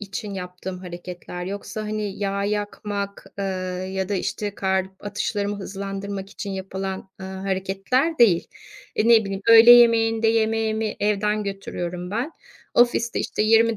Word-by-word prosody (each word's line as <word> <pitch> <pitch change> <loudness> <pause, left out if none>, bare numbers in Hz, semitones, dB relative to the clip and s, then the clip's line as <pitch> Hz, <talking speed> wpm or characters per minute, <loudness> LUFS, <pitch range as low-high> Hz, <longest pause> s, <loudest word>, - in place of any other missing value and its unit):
için 200 0 -5
yaptığım 180 0 -6
hareketler. 180 0 -7
Yoksa, 205 +2 -5
hani, 210 -2 -3
yağ 200 0 -1
yakmak, 205 -1 -3
ııı, 185 -1 -3
ya 190 0 -3
da, 205 - 0
işte, 205 +2 -2
kalp 190 0 -2
atışlarımı 205 0 -2
hızlandırmak 195 0 -5
için 205 -1 -6
yapılan, 190 0 -5
eee, 190 - -6
hareketler 195 - -1
değil. 195 -8 +5 0.5
Eee, 225 - +2
ne 225 -2 +7
bileyim, 195 0 -4
öğle 230 +1 +9
yemeğinde 225 -2 +6
yemeğimi 220 -1 +1
evden 210 0 +1
götürüyorum 180 -2 -5
ben. 245 +9 -2 0.4
Ofiste, 240 -1 +3
işte, - - -1
20 225 +1 +4
200 Hz, 135 wpm, -23 LUFS, 190-220 Hz, 0.5 s, öğle